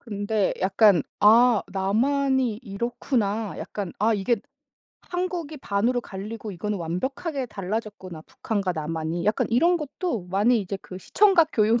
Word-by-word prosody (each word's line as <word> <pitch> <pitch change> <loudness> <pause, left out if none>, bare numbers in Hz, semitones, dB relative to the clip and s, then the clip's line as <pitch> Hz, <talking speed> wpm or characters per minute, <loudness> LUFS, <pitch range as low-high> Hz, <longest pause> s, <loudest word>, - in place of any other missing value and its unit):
근데 205 -2 -1
약간 195 -1 +4 0.2
'아 230 +1 +6
남한이 250 +5 +1
이렇구나. 220 -1 -2
약간 200 -4 -5
아 220 +2 +3
이게 210 +4 +1 0.7
한국이 355 -4 -4
반으로 235 +2 0
갈리고 210 0 -7
이거는 205 +3 -3
완벽하게 260 - -3
달라졌구나 195 -4 -5
북한과 200 +1 -3
남한이.' 160 +1 -3
약간 210 +1 +1
이런 335 +10 +4
것도 285 - -4
많이 210 +5 +2
이제 195 0 -4
그 185 - -9
시청각 375 - +4
교육 225 +2 +3
215 Hz, 305 characters per minute, -25 LUFS, 195-250 Hz, 0.7 s, 아